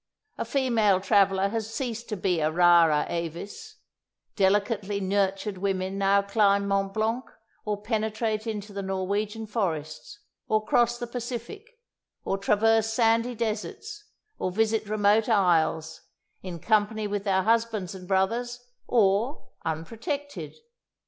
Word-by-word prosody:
A - - -1
female 230 -8 +2
traveller 195 0 +3
has 225 0 -3
ceased 235 -2 -4
to 210 - -3
be 180 -2 0
a 155 0 +2
rara 170 -2 +5
avis; 175 - -6 0.6
delicately 200 +1 +1
nurtured 195 0 -1
women 190 0 -2
now 200 0 +3
climb 200 -1 +2
Mont 195 0 0
Blanc 220 +4 -1 0.4
or 210 -1 -3
penetrate 220 0 -1
into 210 -2 -5
the 200 - -4
Norwegian 200 +3 -2
forests, 180 - -3 0.3
or 215 0 +1
cross 240 0 +2
the 240 - -4
Pacific, 250 - -7 0.5
or 195 - -1
traverse 220 +2 +3
sandy 230 +1 +2
deserts, 235 - -4 0.3
or - - -1
visit 220 +2 0
remote 215 +1 +3
isles, 160 -6 +2 0.4
in 180 -2 -6
company 215 +2 +1
with 205 -1 -2
their 190 -2 +1
husbands 225 -4 0
and 185 -1 -10
brothers, 230 +6 0 0.3
or 225 +4 +1 0.2
"unprotected." 230 - -4
210 Hz, 125 wpm, -26 LUFS, 190-225 Hz, 0.6 s, rara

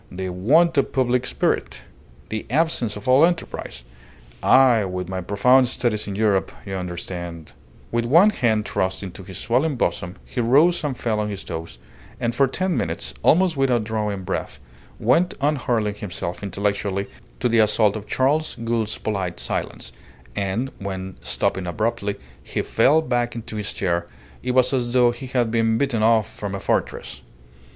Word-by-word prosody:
The 95 +1 -4
want 145 - +3
of - - -1
public 125 -1 +1
spirit! - - -1 0.5
The 110 0 -4
absence 130 -6 +1
of 105 +2 -9
all 130 +4 +6
enterprise! 165 - -1 0.6
I, 125 -5 +5
with 90 -1 -4
my 95 0 -3
profound 125 +8 +4
studies 115 -4 -1
in 100 - -4
Europe, 105 -2 +1
you 95 - -6
understand 85 -2 -6 0.2
" - - -26
With 115 0 0
one 170 - +6
hand 110 - +1
thrust 95 +1 -1
into 95 0 -8
his 95 -1 -9
swelling 135 +6 +1
bosom, 90 -6 -2
he 125 - -3
rose 150 +9 +4
and 140 -4 -2
fell 110 -3 -1
on 105 0 -1
his 100 -2 -5
toes, 80 -7 -6 0.4
and 120 0 -1
for 135 +3 +3
ten 185 +6 -1
minutes, - - -3
almost 180 0 +4
without 130 -4 +2
drawing 105 -3 -2
breath, - - -4 0.4
went 165 +11 +2
on 145 +2 +2
hurling 115 -5 0
himself 90 -4 -5
intellectually 100 0 -1 0.3
to - - +1
the 115 -1 +3
assault 105 -1 +3
of 105 -1 -6
Charles 150 +4 +1
Gould's 115 -2 -1
polite 95 -5 -3
silence; - - -4 0.4
and 100 +7 -1
when, 95 -1 -5
stopping 95 -1 -1
abruptly, 105 +1 -1 0.3
he - - -3
fell 145 +8 +3
back 120 -3 -1
into 115 -1 -7
his 105 -1 -3
chair, 85 -2 -1 0.3
it 125 0 -2
was 130 +1 +4
as 120 -2 0
though 125 -1 +5
he 120 +2 -8
had 120 -3 0
been 115 -1 +2
beaten 135 -5 0
off 110 -1 +4
from 100 -1 -6
a - - -4
fortress. - - -2
110 Hz, 170 wpm, -22 LUFS, 100-130 Hz, 0.6 s, all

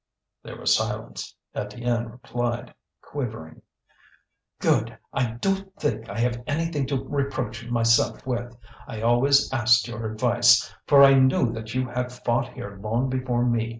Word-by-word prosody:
There - - -9
was - - +2
silence. - - -4 0.2
Étienne 115 +2 -2
replied, 120 0 -4 0.3
quivering: 110 - -6 1.0
"Good! - - +1 0.2
I 120 -3 0
don't 195 +9 -2
think 115 -7 -3
I 100 - -6
have 120 0 0
anything 150 -2 -1
to 135 -1 -2
reproach 130 -4 -3
myself 115 -1 +2
with. 120 -2 -4 0.3
I 110 - -6
always 135 +5 +3
asked 120 -3 +4
your 115 -1 -5
advice, 120 +1 +4
for 140 -1 +7
I 135 -1 +7
knew 130 -3 +3
that 115 0 -7
you 130 0 0
had 125 +1 -3
fought 120 0 -1
here 100 -4 -8
long 115 +5 -1
before 125 -2 0
me. 115 -2 0
120 Hz, 145 wpm, -25 LUFS, 115-130 Hz, 1.0 s, for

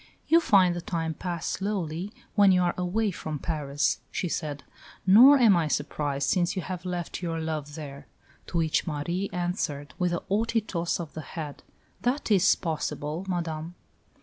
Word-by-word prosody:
"You 330 - +6
find 190 - +4
the 175 - -4
time 165 -2 -2
pass 175 0 -4
slowly 190 -2 -2 0.2
when 200 -2 +6
you 180 -1 +4
are 175 - +1
away 195 +4 0
from 155 -3 -5
Paris," 145 -2 -1
she 180 - -2
said; 150 -4 -3 0.4
"nor 245 +9 +9
am 230 -7 +6
I 165 -3 +1
surprised, 145 -1 -1
since 175 0 +1
you 185 - -2
have 185 -1 -6
left 175 -1 -4
your 165 -2 -2
lover 155 -2 -3
there"; 140 -3 -8 0.4
to 175 - -3
which 160 0 +1
Marie 170 +5 -2
answered 175 -5 -3
with 180 -1 +1
a 170 - -2
haughty 225 +3 +1
toss 175 -6 -2
of 165 -3 -6
the 155 - -5
head, 150 -2 -7 0.4
"That 250 -1 -1
is 195 -2 +5
possible, 160 +1 -3
Madame." 165 -1 -3
175 Hz, 170 wpm, -27 LUFS, 155-190 Hz, 0.4 s, nor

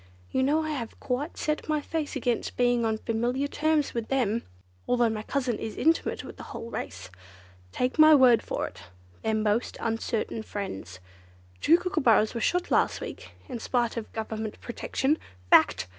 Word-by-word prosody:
You 260 - +1
know 300 +4 +2
I 310 - -2
have 240 -6 -5
quite 270 +5 -3
set 305 +1 -2
my 305 -1 +2
face 305 0 -3
against 245 -3 -1
being 245 -1 +3
on 220 -1 +1
familiar 240 +5 -1
terms 310 0 +1
with 230 -2 -3
them, 235 -4 +1 0.5
although 240 -2 +3
my 215 -1 -3
cousin 250 -1 -1
is 220 - -5
intimate 325 +1 +1
with - - -10
the - - -8
whole 230 - -7
race. 95 -1 -6 0.6
Take 250 - -1
my 310 0 +9
word 255 -4 +6
for - - -3
it, - - -10 0.4
they're 220 0 0
most 215 +2 0
uncertain 225 0 -2
friends. 95 - -6 0.6
Two 330 - +6
Kookooburras 280 - +2
were 235 - -3
shot 355 +7 0
last - - +2
week, - - -8
in 250 -5 -5
spite 240 -1 0
of 230 -2 -5
Government 220 -1 -4
protection. 265 +5 -1 0.3
Fact!" 85 +3 +5
240 Hz, 170 wpm, -27 LUFS, 220-290 Hz, 0.6 s, my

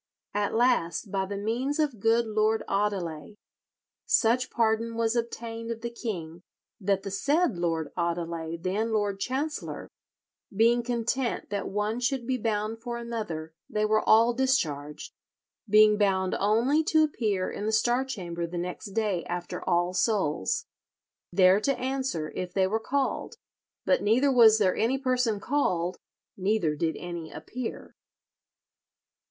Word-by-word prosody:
At 205 +1 -1
last, 225 -6 +1
by 190 -1 -1
the 200 +1 -4
means 240 +8 -1
of 290 -8 0
good 225 +3 +3
Lord 215 0 +1
Audeley, 195 -5 -2 0.7
such 250 +3 +3
pardon 230 0 0
was 230 0 +1
obtained 230 -1 -4
of 230 -1 -4
the 235 0 -4
king 175 -9 -5 0.4
that 195 -1 0
the 195 - -5
said 285 - +1
Lord 165 -3 -1
Audeley, 170 -1 -2
then 205 +6 -1
Lord 205 -2 0
Chancellor, 285 +7 -3 0.6
being 230 +4 +3
content 240 0 -2
that 200 -1 -2
one 210 +3 -1
should 245 0 -1
be 255 0 -1
bound 220 0 -2
for 240 0 -4
another, 210 -10 -5 0.2
they 215 0 0
were 215 0 +3
all 230 +2 +5
discharged, 155 - -1 0.6
being 215 0 +6
bound 190 -2 +2
only 235 +10 +3
to 315 -1 +4
appear 210 -11 -1
in 210 - -4
the - - +1
Star 240 +3 +2
Chamber 175 -9 -4
the 175 +1 -6
next 180 +3 -5
day 205 -5 0
after 175 0 -4
All 175 0 +2
Souls, 185 - 0 0.7
there 185 +2 +5
to 275 +5 0
answer 260 -12 -2
if 180 -1 -5
they 190 -1 +3
were 215 +4 0
called; 275 - -2 0.5
but - - +3
neither 245 +7 +3
was 225 -4 +7
there 190 -4 +2
any 235 +5 +1
person 250 -5 0
called, 185 -9 0 0.4
neither 190 -5 0
did 160 +1 -1
any 170 -2 -6
appear." 250 -1 -7
215 Hz, 145 wpm, -27 LUFS, 185-235 Hz, 0.7 s, was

